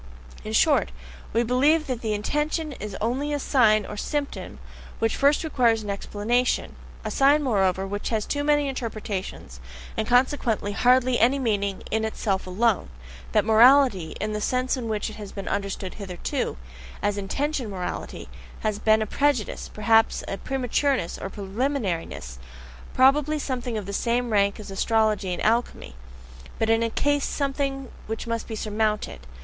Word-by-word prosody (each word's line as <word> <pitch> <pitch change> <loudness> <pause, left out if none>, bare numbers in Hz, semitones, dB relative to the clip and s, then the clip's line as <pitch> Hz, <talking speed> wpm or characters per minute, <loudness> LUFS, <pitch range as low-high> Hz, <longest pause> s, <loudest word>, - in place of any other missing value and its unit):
In - - -5
short, 65 - +3 0.4
we 230 +2 +2
believe 285 +7 +3
that 250 -3 -3
the 215 -2 -1
intention 300 +8 -1
is 210 -6 -6
only 260 +7 -1
a 290 - 0
sign 220 -7 +3
or 210 - -7
symptom, 290 +5 -3 0.4
which 225 0 0
first 285 +3 +3
requires 235 -8 +2
an 205 - -3
explanation 215 +5 -1 0.3
a - - -2
sign, 285 +2 +4
moreover, 195 -6 +1
which 205 +1 -4
has 220 -2 -1
too 290 0 -2
many 295 -1 +2
interpretations, 215 - -5 0.4
and 220 - -2
consequently 245 -4 +2
hardly 250 +3 +3
any 250 +5 +4
meaning 200 -6 -1
in 220 0 +1
itself 205 -3 -2
alone: 205 - +1 0.4
that 210 -2 +3
morality, 225 - +5
in 215 +1 -2
the 210 - -3
sense 255 +4 0
in 245 -3 -4
which 210 -1 -1
it - - -11
has 205 -2 -8
been 195 -2 -7
understood 195 -1 -3
hitherto, 185 - -4 0.5
as 205 0 +1
intention 255 +5 -2
morality, 185 -3 -5 0.3
has 215 -2 -1
been 220 0 +3
a - - -3
prejudice, 275 -1 0
perhaps 225 +1 +3
a 195 - -3
prematureness 265 -5 -1
or 195 - -5
preliminariness, 195 - -3 0.6
probably 290 +4 +4
something 250 -5 -3
of 210 - -4
the 200 - -6
same 240 +3 0
rank 200 -1 +2
as 210 -2 -8
astrology 215 -1 +1
and 180 - -3
alchemy, 230 - 0 0.6
but 225 0 +1
in 225 0 +3
any 230 - +1
case 290 +4 +1
something 275 -1 -2 0.2
which 225 +1 -4
must 230 -1 -3
be 225 - -5
surmounted. 210 - -2
225 Hz, 155 wpm, -25 LUFS, 205-265 Hz, 0.6 s, morality